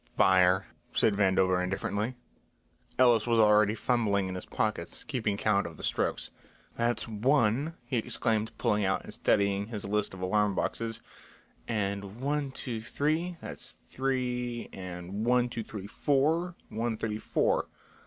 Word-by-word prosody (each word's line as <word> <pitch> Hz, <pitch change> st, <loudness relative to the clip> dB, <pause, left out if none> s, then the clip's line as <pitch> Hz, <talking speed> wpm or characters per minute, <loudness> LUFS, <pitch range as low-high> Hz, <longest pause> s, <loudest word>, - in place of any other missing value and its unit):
"Fire," 95 Hz, 0 st, +5 dB, 0.3 s
said 110 Hz, -, +4 dB
Vandover 95 Hz, -2 st, +3 dB
indifferently. 100 Hz, +5 st, -2 dB, 0.8 s
Ellis 120 Hz, -3 st, +5 dB
was 115 Hz, -1 st, +3 dB
already 105 Hz, -1 st, +5 dB
fumbling 105 Hz, -6 st, +1 dB
in 95 Hz, -, -4 dB
his 90 Hz, -, -6 dB
pockets, 105 Hz, -6 st, -2 dB
keeping 110 Hz, -9 st, -1 dB
count 100 Hz, -2 st, +2 dB
of 80 Hz, -2 st, -10 dB
the -, -, -9 dB
strokes. -, -, -1 dB, 0.4 s
"That's 120 Hz, 0 st, 0 dB
one," 125 Hz, +6 st, +2 dB
he 120 Hz, +1 st, -1 dB
exclaimed, 110 Hz, -1 st, +1 dB
pulling 105 Hz, 0 st, +1 dB
out 95 Hz, 0 st, 0 dB
and -, -, -9 dB
studying 100 Hz, 0 st, +1 dB
his 110 Hz, -3 st, -5 dB
list 100 Hz, -1 st, -1 dB
of 95 Hz, -, -10 dB
alarm 105 Hz, +2 st, +2 dB
boxes, 115 Hz, +2 st, -2 dB, 0.7 s
"and 100 Hz, 0 st, -2 dB
one 145 Hz, +1 st, -1 dB
two 120 Hz, -4 st, -4 dB
three, 155 Hz, +9 st, -1 dB
that's -, -, -8 dB
three 125 Hz, -2 st, -2 dB
and 90 Hz, +2 st, -5 dB
one 125 Hz, +1 st, +3 dB
two 120 Hz, -1 st, -4 dB
three 105 Hz, -2 st, -7 dB
four, 155 Hz, -, +1 dB
one 115 Hz, 0 st, -2 dB
thirty 110 Hz, -1 st, -3 dB
four. -, -, +1 dB
110 Hz, 145 wpm, -29 LUFS, 100-125 Hz, 0.8 s, Fire